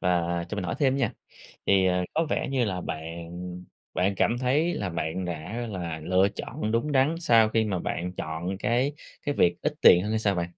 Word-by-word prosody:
Và 85 -1 +1
cho - - -4
mình 100 -3 -3
hỏi 85 - -2
thêm 135 -2 +3
nha, 130 -6 +1 0.6
thì, 95 -1 +5
ờ, 90 0 +1
có 160 +2 +1
vẻ - - 0
như 130 -3 +1
là 90 -4 -2
bạn 85 +3 -6 0.3
bạn 95 +2 +1
cảm 120 - +2
thấy 140 +7 +1
là 100 -3 -2
bạn 85 +2 -3
đã 90 +8 -4
là 85 -5 -4
lựa 95 +3 +3
chọn 115 -4 -4
đúng 115 +7 0
đắn 140 +3 +3
sau 115 -9 +5
khi 110 0 +2
mà 95 -4 -1
bạn 90 +1 -3
chọn 85 +3 -4
cái 125 +7 +1 0.3
cái 145 - 0
việc 85 0 +2
ít 150 0 0
tiền 90 - +8
hơn 105 - -3
hay 110 - +1
sao 100 -2 +1
bạn? 85 -1 -2
95 Hz, 215 wpm, -27 LUFS, 85-120 Hz, 0.6 s, tiền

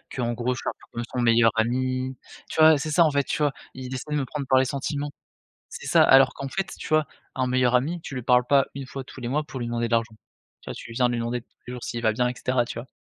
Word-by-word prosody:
qu'en 120 -2 -1
gros, 125 +2 -1
je - - -6
suis - - -2
un - - -2
peu - - -21
comme 120 - -4
son 125 - 0
meilleur 115 -1 +5
ami, 130 +2 -1 0.3
tu - - -4
vois? 155 -2 +7
C'est 155 - -3
ça, 170 +3 +5
en 155 - +3
fait, 140 -1 +1
tu 150 - -1
vois? 145 -2 +2 0.2
Il 130 0 -7
essaye 150 +3 -4
de - - +1
me - - -2
prendre 140 +1 -5
par 130 - +5
les 130 - +4
sentiments. 145 +2 -3 0.6
C'est - - -8
ça, - - +5
alors 135 0 +6
qu'en 135 - -5
fait, 195 +6 -3
tu - - -7
vois? 155 -1 +3 0.3
Un 130 -1 0
meilleur 125 -1 +2
ami, 160 +8 -1
tu - - -7
lui 125 - -4
parles 125 0 +3
pas 140 -1 +4
1 140 -1 -5
fois 135 0 -7
tous 130 - -12
les 120 - -3
mois, 150 +4 0
pour 145 -3 -8
lui 120 - -3
demander 120 0 -1
de - - -7
l'argent, 115 -1 +1 0.5
tu - - -8
vois? - - -4
Tu - - -10
viens 125 +1 +2
lui 120 - -1
demander 120 +1 -2
tous - - -40 0.2
les 125 - -6
jours 125 - -7
s'il 120 - -4
va 110 -2 +3
bien 125 +2 +1
et 125 - -3
cetera, 125 0 0
tu 120 - -7
vois? 125 - -7
130 Hz, 305 wpm, -25 LUFS, 120-140 Hz, 0.6 s, vois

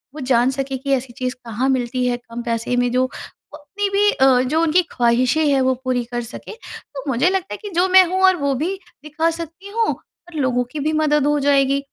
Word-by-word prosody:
वो - - -7
जान 250 -1 +2
सके 270 0 -3
कि 275 +2 -4
ऐसी 255 -2 -2
चीज़ 255 0 -4
कहाँ 235 +4 -1
मिलती 255 -1 -1
है 245 -1 0
कम 240 0 -9
पैसे 230 +1 -2
में, 245 0 +1
जो 255 +1 +2
वो 260 +3 -9
अपनी 395 +8 -4
भी 405 +1 +3
अ, 260 -1 +4
जो 295 +6 0
उनकी 330 +2 +3
ख़्वाहिशें 250 +5 +2
हैं, 275 -2 +2
वो 260 0 +2
पूरी 255 -2 0
कर 240 0 -2
सके। 235 - -9 0.4
तो 275 - -5
मुझे 265 +7 +2
लगता 380 -1 -2
है - - -5
कि 415 - -6
जो 360 +2 +3
मैं 375 0 +8
हूँ, 375 0 +4
वो 280 -5 -1
भी 330 +9 -2 0.3
दिखा 310 +2 0
सकती 335 +4 -8
हूँ 455 -1 +2
और 350 -1 -19
लोगों 250 -2 +1
की 305 - -5
भी 305 +2 -1
मदद 300 -2 +2
हो 295 0 +2
जाएगी। 275 -1 +2
275 Hz, 225 wpm, -20 LUFS, 250-320 Hz, 0.4 s, मैं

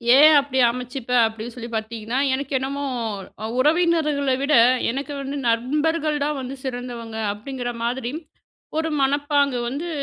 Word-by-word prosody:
ஏன் 305 +3 +8
அப்டி 275 -1 -3
அமைச்சுப்பேன் 250 0 -1
அப்டின்னு 225 +1 -5
சொல்லி 235 -1 -7
பாத்தீங்கன்னா, 220 +2 -3 0.2
எனக்கு 275 +2 -3
என்னமோ 275 +2 -3 0.6
அ - - -2
''உறவினர்கள 305 -2 +2
விட 285 +2 +3 0.4
எனக்கு 280 +3 -4
வந்து 275 +1 -4
நண்பர்கள் 300 +6 +1
தான் 300 0 -1
வந்து 260 +1 -6
சிறந்தவங்க'' 235 -4 -4
அப்டிங்கிற 245 +3 -5
மாதிரி 245 +1 -2 0.7
ஒரு 320 0 -1
மனப்பாங்கு 285 -1 +2
வந்து 290 +7 -4
265 Hz, 130 wpm, -23 LUFS, 240-290 Hz, 0.7 s, ஏன்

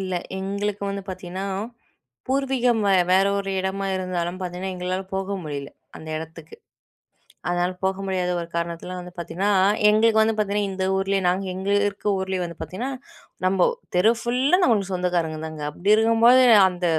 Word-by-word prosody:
இல்ல. 185 -1 -4 0.3
எங்களுக்கு 200 +1 -3
வந்து 200 0 -4
பார்த்தீங்கன்னா, 185 +1 -5 0.8
பூர்வீகம் 260 -4 +1
வே 195 - +4 0.2
வேற 190 +1 +5
ஒரு 195 0 -3
இடமா 195 +1 -2
இருந்தாலும் 180 -1 -3
பார்த்தீங்கன்னா, 185 +1 -4
எங்களால 180 +1 -3
போக 195 +1 -2
முடியல. 145 -3 -5 0.3
அந்த 160 - -10
இடத்துக்கு. 160 0 -9 0.9
அதனால, 175 +1 0
போக 190 0 +1
முடியாத 180 -2 -1
ஒரு 170 - -6
காரணத்திலா 170 +1 -3
வந்து 180 0 -10
பார்த்தீங்கன்னா, 185 +4 -1 0.4
எங்களுக்கு 220 +1 +4
வந்து 220 0 +2
பார்த்தீங்கன்னா, 205 -1 0
இந்த 190 0 -2
ஊர்லே 195 0 +1
நாங்க 185 +2 +1
எங்க 190 +2 -4 0.2
இருக்க 200 +1 -7
ஊர்லே 190 0 -2
வந்து 170 -1 -7
பார்த்தீங்கன்னா, 245 +9 -4 0.5
நம்போ 185 -1 +3 0.3
தெரு 205 +6 +5
ஃபுல்லா 260 +8 +2
நம்மளுக்கு 205 - +2
சொந்தக்காரங்க 175 -3 -1
தாங்க. 155 -1 -7
அப்பிடி 195 +7 +1
இருக்கும்போது, 230 +3 +5 0.2
அந்த 180 -1 -3
190 Hz, 150 wpm, -23 LUFS, 180-205 Hz, 0.9 s, வேற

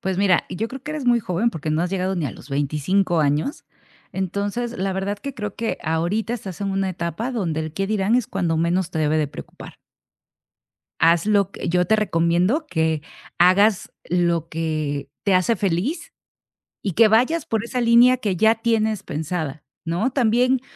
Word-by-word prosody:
Pues 190 -1 -2
mira, 195 -3 +3
yo 220 +5 -3
creo 265 +1 -8
que 300 - -5
eres 305 -3 -4
muy 240 -1 +4
joven, 200 +4 0
porque 160 -3 -4
no 155 +2 +1
has 175 - -2
llegado 190 0 -1
ni 165 -4 -1
a - - -4
los - - -13
25 155 +6 +1
años. 150 - 0 0.5
Entonces. 200 +6 -3
la 195 +1 -1
verdad 195 +2 -2
que 275 +4 -6
creo 210 -4 -5
que 225 +1 -2
ahorita 170 +8 -1
estás 195 -6 -8
en 200 -1 -1
una 195 0 0
etapa 175 +7 -3
donde 170 -10 -2
el 155 -1 -5
"¿qué 195 +4 -2
dirán?", 210 +1 +1
es 250 -3 +2
cuando 175 -4 -1
menos 170 +2 0
te 160 - -4
debe 155 0 +2
de 150 -2 0
preocupar. - - -11 1.2
Haz 170 +2 +4
lo 200 -2 +2
que - - -5
yo 180 +1 +2
te 220 - +3
recomiendo 180 - +1
que 160 - 0 0.4
hagas 190 +3 +4 0.2
lo 170 -2 +1
que 155 -4 -3 0.2
te 200 - +3
hace 185 +5 +3
feliz, 200 - -2 0.7
y 195 - -2
que 220 +4 +5
vayas 255 +9 +2
por 225 -1 -1
esa 250 +1 -2
línea 240 +2 +6
que 210 -6 -1
ya 220 +3 +4
tienes 220 -2 0
pensada, 155 -1 -4 0.2
¿no?, 175 +10 0
también 250 0 +2
190 Hz, 185 wpm, -22 LUFS, 165-225 Hz, 1.2 s, línea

